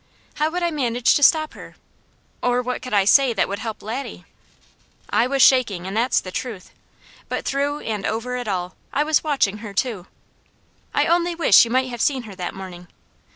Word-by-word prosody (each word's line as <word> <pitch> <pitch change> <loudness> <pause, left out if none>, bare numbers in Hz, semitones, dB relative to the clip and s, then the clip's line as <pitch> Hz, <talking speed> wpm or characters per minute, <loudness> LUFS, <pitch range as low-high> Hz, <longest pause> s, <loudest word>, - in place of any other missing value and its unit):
How 305 +1 +1
would 350 +2 -3
I 340 - +1
manage 245 -5 +1
to - - +1
stop 310 +2 +4
her? - - -12 0.7
Or 245 0 +1
what 250 0 -3
could 255 - -8
I 200 -2 +3
say 265 +3 +5
that 205 - +1
would 200 +1 -4
help 220 -1 -6
Laddie? 235 +6 -6 0.9
I 235 - +3
was 275 +1 +3
shaking, 215 -9 +3
and 190 +2 -5
that's 235 +3 +2
the 185 - -8
truth; 220 -4 -6 0.6
but - - -3
through 285 +2 -1
and 210 -3 -4
over 235 +3 -3
it 245 -2 -5
all, 180 -2 -3 0.2
I 295 - +1
was 310 0 +1
watching 270 -9 0
her 210 -2 -9
too. 205 -5 -2 0.8
I - - +2
only 345 0 +1
wish 325 - +6
you - - -6
might 260 +2 +1
have 240 -2 -5
seen 270 -4 +1
her 215 -3 -10
that 180 -2 -6
morning. 180 -2 -9
245 Hz, 200 wpm, -22 LUFS, 200-275 Hz, 0.9 s, wish